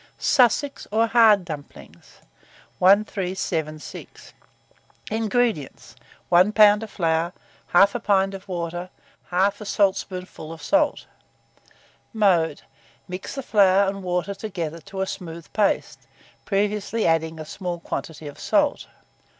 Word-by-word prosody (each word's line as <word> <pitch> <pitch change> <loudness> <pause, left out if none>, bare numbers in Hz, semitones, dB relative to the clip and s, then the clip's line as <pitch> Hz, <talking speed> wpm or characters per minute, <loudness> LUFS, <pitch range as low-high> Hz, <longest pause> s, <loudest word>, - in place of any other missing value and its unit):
SUSSEX, 275 +3 +2
or 225 +2 +3
HARD 220 -5 +5
DUMPLINGS. 150 -4 -11 0.6
1376. 185 -5 -1 0.8
INGREDIENTS. 220 - -1 0.3
1 180 +4 +5
lb. 210 -1 +6
of 225 - -7
flour, 165 -1 0 0.4
1/2 200 +3 +4
pint 195 -1 +2
of 195 +1 -9
water, 175 0 -4 0.4
1/2 200 +3 +1
saltspoonful 185 -5 -1
of 165 - -10
salt. 300 -1 +1 1.1
Mode. 175 -8 +2 0.4
Mix 185 +8 -6
the 275 - -4
flour 200 -3 +4
and 195 0 -3
water 180 +1 -2
together 175 -6 -5
to 190 +5 -6
a - - +1
smooth 170 -3 -7
paste, 210 -2 0 0.4
previously 210 +2 -1
adding 160 0 +1
a 155 - -6
small 175 +1 -5
quantity 160 -2 -6
of 145 - -10
salt. - - +1
190 Hz, 110 wpm, -23 LUFS, 170-210 Hz, 1.1 s, lb